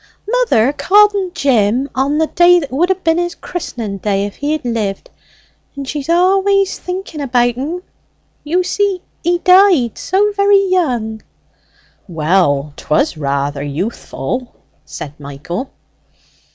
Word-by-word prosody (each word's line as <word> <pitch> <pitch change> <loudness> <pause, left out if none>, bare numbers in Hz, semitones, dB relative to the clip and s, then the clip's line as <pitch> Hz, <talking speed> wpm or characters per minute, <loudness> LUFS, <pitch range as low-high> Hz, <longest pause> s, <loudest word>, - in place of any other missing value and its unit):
Mother 435 - +2
called 415 +6 +4
en 390 -2 -2
Jim 260 - +1
on 275 +3 0
the 320 - +2
day 350 +2 +5
that 290 -5 -3
would 330 +8 +1
ha' 380 0 -1
been 325 +1 +2
his 350 0 -2
christening 230 - -6
day 200 0 0
if 205 - -8
he 290 +1 -2
had 310 -4 -4
lived; 215 -5 -3 0.6
and 280 -1 -6
she's 290 +1 -5
always 385 +3 +2
thinking 365 -4 -6
about 245 -3 +1
en. 315 +8 -4 0.6
You 350 +5 0
see 385 0 -1 0.2
he 350 +1 +2
died 360 - +4
so 405 +3 +1
very 400 0 +4
young." 240 -12 0 0.9
"Well, 155 -4 +1
'twas 155 - 0
rather 140 -1 -2
youthful," 205 - -4 0.3
said 150 0 -9
Michael. 145 - -6
280 Hz, 135 wpm, -16 LUFS, -, 0.9 s, day